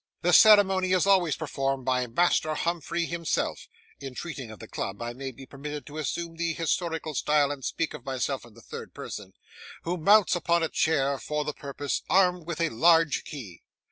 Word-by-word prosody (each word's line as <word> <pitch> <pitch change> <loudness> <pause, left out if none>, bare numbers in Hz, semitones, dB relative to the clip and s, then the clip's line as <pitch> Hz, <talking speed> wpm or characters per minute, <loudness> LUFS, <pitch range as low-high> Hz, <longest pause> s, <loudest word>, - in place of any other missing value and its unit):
The 175 +1 +3
ceremony 195 -3 +6
is 185 -1 +3
always 185 -6 +3
performed 135 -3 -2
by 125 -1 +1
Master 155 +4 +2
Humphrey 170 +1 -1
himself 170 -1 -2 0.3
(in 135 -2 -8
treating 140 -7 -6
of 110 - -10
the - - -11
club, 95 +1 -5
I 120 0 -4
may 135 +2 -6
be 135 +2 -12
permitted 145 +2 -7
to 150 +1 -8
assume 165 +3 -4
the 165 -1 -1
historical 165 -1 -2
style, 145 +1 +2
and 140 -2 -6
speak 165 - -2
of - - -9
myself 135 0 -2
in 115 -3 -16
the - - -15
third - - -9
person), 95 -2 -7 0.5
who 175 +2 -2
mounts 200 +2 +5
upon 170 -1 +1
a 160 - 0
chair 140 -4 +1
for 150 0 -3
the 150 - -2
purpose, 140 0 -4
armed 180 -3 +3
with 170 -2 -4
a 165 - +2
large 160 +4 +3
key. 110 - -9
155 Hz, 190 wpm, -27 LUFS, 135-170 Hz, 0.5 s, ceremony